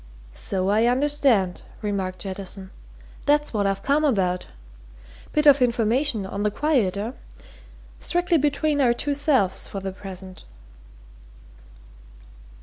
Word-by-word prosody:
"So 190 Hz, 0 st, -2 dB
I 220 Hz, +3 st, +3 dB
understand," 255 Hz, -8 st, +2 dB, 0.2 s
remarked 190 Hz, -3 st, -2 dB
Jettison. 190 Hz, 0 st, -6 dB, 0.6 s
"That's 295 Hz, -1 st, +2 dB
what 205 Hz, -2 st, +1 dB
I've 195 Hz, 0 st, -2 dB
come 285 Hz, +3 st, +2 dB
about. 190 Hz, -10 st, +1 dB, 0.8 s
Bit 300 Hz, 0 st, +1 dB
of 285 Hz, -2 st, +7 dB
information, 235 Hz, -1 st, +1 dB
on 200 Hz, +1 st, -5 dB
the 210 Hz, -, +2 dB
quiet, 240 Hz, -7 st, +1 dB
eh? 215 Hz, +4 st, -3 dB, 0.9 s
Strictly 350 Hz, -1 st, +1 dB
between 295 Hz, +1 st, +1 dB
our 245 Hz, -3 st, +4 dB
two 285 Hz, +4 st, -1 dB
selves 265 Hz, -10 st, +1 dB
for 195 Hz, -, -5 dB
the 190 Hz, 0 st, -4 dB
present." 190 Hz, -1 st, -9 dB
220 Hz, 120 wpm, -24 LUFS, 195-285 Hz, 0.9 s, of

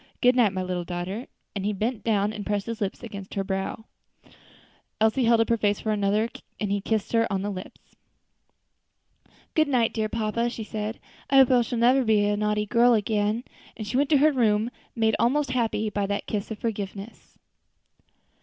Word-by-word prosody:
Good 250 Hz, 0 st, +4 dB
night, 235 Hz, -5 st, +4 dB
my 185 Hz, -1 st, -3 dB
little 180 Hz, -1 st, -2 dB
daughter," 180 Hz, +7 st, -5 dB, 0.3 s
and 195 Hz, -, -3 dB
he 210 Hz, +1 st, 0 dB
bent 220 Hz, +4 st, -2 dB
down 210 Hz, -2 st, +1 dB
and 210 Hz, -1 st, -5 dB
pressed 205 Hz, -1 st, -1 dB
his 230 Hz, -1 st, -5 dB
lips 195 Hz, -2 st, -1 dB
to 200 Hz, -5 st, -8 dB
her 195 Hz, -, 0 dB
brow. 195 Hz, +3 st, -3 dB, 1.1 s
Elsie 220 Hz, +4 st, +3 dB
held 230 Hz, 0 st, +5 dB
up 225 Hz, -, 0 dB
her 230 Hz, -, +3 dB
face 205 Hz, -1 st, +1 dB
for 220 Hz, -, -2 dB
another, 210 Hz, +1 st, +1 dB, 0.3 s
and 210 Hz, -2 st, -2 dB
he 200 Hz, 0 st, 0 dB
kissed 220 Hz, +1 st, -2 dB
her 230 Hz, 0 st, +3 dB
lips. 195 Hz, -1 st, -5 dB, 1.6 s
"Good 315 Hz, -1 st, +3 dB
night, 245 Hz, -5 st, +2 dB
dear 215 Hz, -1 st, -1 dB
papa," 230 Hz, +1 st, -1 dB
she 230 Hz, -2 st, -6 dB
said, 215 Hz, +1 st, -4 dB, 0.3 s
"I 275 Hz, -, +2 dB
hope 265 Hz, -1 st, +7 dB
I 250 Hz, -1 st, +5 dB
shall 240 Hz, +1 st, -3 dB
never 250 Hz, +3 st, +4 dB
be 215 Hz, -3 st, +3 dB
such 205 Hz, 0 st, +2 dB
a -, -, -1 dB
naughty 210 Hz, 0 st, 0 dB
girl 235 Hz, +2 st, +4 dB
again." 215 Hz, +1 st, 0 dB, 0.3 s
And 215 Hz, -, -5 dB
she 210 Hz, +4 st, -4 dB
went 280 Hz, +2 st, +2 dB
to 300 Hz, -, +5 dB
her 305 Hz, +3 st, +5 dB
room, 225 Hz, -3 st, +2 dB, 0.2 s
made 220 Hz, -2 st, +2 dB
almost 275 Hz, +3 st, +2 dB
happy 225 Hz, -3 st, 0 dB
by 205 Hz, -1 st, -1 dB
that 200 Hz, 0 st, -2 dB
kiss 205 Hz, -2 st, -3 dB
of 220 Hz, -, -5 dB
forgiveness. 205 Hz, -1 st, -6 dB
215 Hz, 190 wpm, -26 LUFS, 205-235 Hz, 1.6 s, hope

